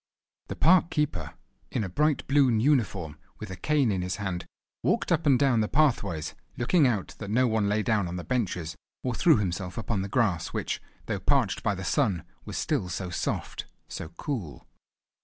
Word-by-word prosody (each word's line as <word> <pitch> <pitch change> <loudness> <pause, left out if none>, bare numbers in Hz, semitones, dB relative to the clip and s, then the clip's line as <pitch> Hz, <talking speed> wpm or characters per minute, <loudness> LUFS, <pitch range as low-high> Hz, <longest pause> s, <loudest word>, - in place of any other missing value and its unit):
The - - -5
park 175 0 +5
keeper, 150 -3 -2 0.3
in - - -1
a - - -2
bright 150 - +1
blune 135 -5 +4
uniform 105 - +1 0.2
with - - -7
a - - -4
cane 140 +3 +2
in 95 -2 0
his 90 +1 -2
hand, 95 -4 -4 0.3
walked - - +1
up 160 -2 +2
and 135 -3 +6
down 130 -3 +3
the 105 - +1
pathways, 100 - +1 0.2
looking 140 +4 +4
out 110 -6 -1
that 100 - -6
no 125 +5 +3
one 110 -3 +1
lay 105 +1 +1
down 105 -3 +1
on 85 - -5
the 90 - -4
benches, 90 -10 -2 0.3
or 125 - -1
threw 160 +5 +5
himself 90 -2 -3
upon 110 -3 -1
the 100 - -4
grass, 95 -8 +1
which, - - -2 0.2
though - - -2
parched - - +1
by - - 0
the - - -6
sun, 90 -5 +1 0.2
was - - -5
still 120 - -1
so 90 0 -4
soft, 85 - -3 0.2
so 80 - -6
cool. 110 - -4
110 Hz, 190 wpm, -28 LUFS, 90-135 Hz, 0.3 s, and